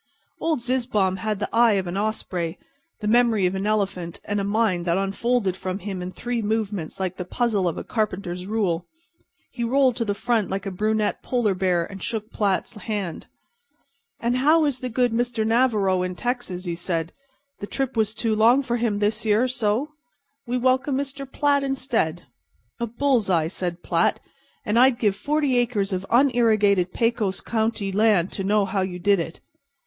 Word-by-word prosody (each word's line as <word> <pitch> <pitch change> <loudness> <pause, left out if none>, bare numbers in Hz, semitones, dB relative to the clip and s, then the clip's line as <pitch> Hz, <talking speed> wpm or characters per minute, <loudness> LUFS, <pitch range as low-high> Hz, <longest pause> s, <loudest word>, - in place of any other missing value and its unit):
Old 315 -6 0
Zizzbaum 235 -7 0
had 215 +2 -2
the 205 - -1
eye 230 -1 +5
of 190 -2 0
an 175 +1 -4
osprey, 190 -5 -2 0.4
the 210 - -2
memory 230 -3 +4
of 180 - +1
an 195 +2 -2
elephant 195 -5 -1
and 205 0 -1
a - - -1
mind 200 -3 +1
that 170 0 +1
unfolded 195 +1 0
from 185 0 -4
him 190 -1 -5
in 180 +1 -5
three 240 +3 -3
movements 205 -6 -2
like 185 -1 -2
the 180 - -3
puzzle 205 -1 0
of 170 - -1
the - - -5
carpenter's 185 -5 -3
rule. 195 -6 -1 0.6
He 240 - -4
rolled 255 +1 +3
to 235 - 0
the 205 -2 -1
front 225 0 0
like 195 +1 -3
a 195 - -3
brunette 215 +2 0
polar 240 -5 +1
bear, 180 -2 +1
and 195 +1 -10
shook 220 -1 -3
Platt's 200 +1 0
hand. 205 -5 -4 0.9
"And 240 +2 0
how 310 +4 +4
is 275 -4 -1
the 255 - -4
good 245 +1 +1
Mr. 235 -1 0
Navarro 220 -6 +2
in 180 0 -3
Texas?" 240 -6 -3
he 175 - -2
said. 170 -1 -3 0.5
"The 205 - -5
trip 270 +1 -2
was 220 -1 +1
too 225 -2 0
long 235 +6 +5
for 240 -2 -1
him 225 -3 0
this 210 +2 0
year, 220 +3 +3
so? 240 +2 0 0.6
We 245 +1 0
welcome 260 +2 +2
Mr. 275 -1 -5
Platt 285 -1 +2
instead." 250 -11 -1 0.6
"A 235 - -1
bull's 240 -2 +1
eye," 165 -3 +2
said 175 -1 -4
Platt, 170 0 +1 0.5
"and 215 +3 +2
I'd 255 -1 +5
give 210 -5 +1
forty 290 -2 0
acres 220 -5 0
of 185 +1 -3
unirrigated 220 -8 +3
Pecos 230 -4 0
County 220 -3 -1
land 200 -3 +3
to 195 - -4
know 205 +1 +2
how 195 0 -1
you 185 -1 -3
did 200 +2 +3
it." 165 0 -5
215 Hz, 185 wpm, -24 LUFS, 190-240 Hz, 0.9 s, eye